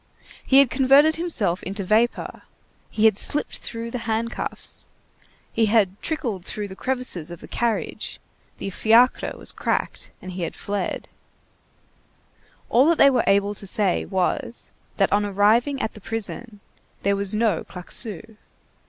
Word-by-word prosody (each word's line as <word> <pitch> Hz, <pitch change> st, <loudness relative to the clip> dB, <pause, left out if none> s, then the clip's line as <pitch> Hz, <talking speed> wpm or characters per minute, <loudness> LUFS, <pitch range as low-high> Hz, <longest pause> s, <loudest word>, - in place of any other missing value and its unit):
He 265 Hz, -, +4 dB
had 275 Hz, -3 st, +6 dB
converted 280 Hz, +4 st, +5 dB
himself 240 Hz, -, +1 dB
into 195 Hz, +2 st, -4 dB
vapor, 220 Hz, +5 st, +1 dB, 0.5 s
he 215 Hz, -, +1 dB
had 215 Hz, -2 st, +5 dB
slipped 295 Hz, -, -1 dB
through 230 Hz, 0 st, -6 dB
the 250 Hz, -, -3 dB
handcuffs, 230 Hz, +2 st, -3 dB, 0.7 s
he 225 Hz, -1 st, +2 dB
had 205 Hz, -3 st, +2 dB
trickled 240 Hz, -, -2 dB
through 205 Hz, +2 st, -3 dB
the 190 Hz, -, -8 dB
crevices 250 Hz, -10 st, -2 dB
of 175 Hz, -1 st, -8 dB
the -, -, -11 dB
carriage, 235 Hz, -2 st, -2 dB, 0.4 s
the 195 Hz, -, -5 dB
fiacre 230 Hz, +6 st, +3 dB
was -, -, -3 dB
cracked, -, -, -2 dB
and 185 Hz, -, -8 dB
he 180 Hz, 0 st, -6 dB
had 165 Hz, -, -3 dB
fled; 200 Hz, -2 st, -3 dB, 1.6 s
all 255 Hz, +5 st, +4 dB
that 335 Hz, -, +3 dB
they 280 Hz, -, +7 dB
were 255 Hz, -, +2 dB
able 200 Hz, +1 st, +3 dB
to 200 Hz, -1 st, -8 dB
say 195 Hz, -1 st, +1 dB
was, 190 Hz, +5 st, -1 dB, 0.3 s
that -, -, +2 dB
on 205 Hz, 0 st, +3 dB
arriving 215 Hz, +7 st, +2 dB
at -, -, -2 dB
the 210 Hz, -, -13 dB
prison, 225 Hz, 0 st, -5 dB, 0.4 s
there 200 Hz, 0 st, +2 dB
was 200 Hz, +1 st, -1 dB
no 215 Hz, -6 st, +1 dB
Claquesous. 210 Hz, +4 st, -5 dB
215 Hz, 150 wpm, -23 LUFS, 200-240 Hz, 1.6 s, they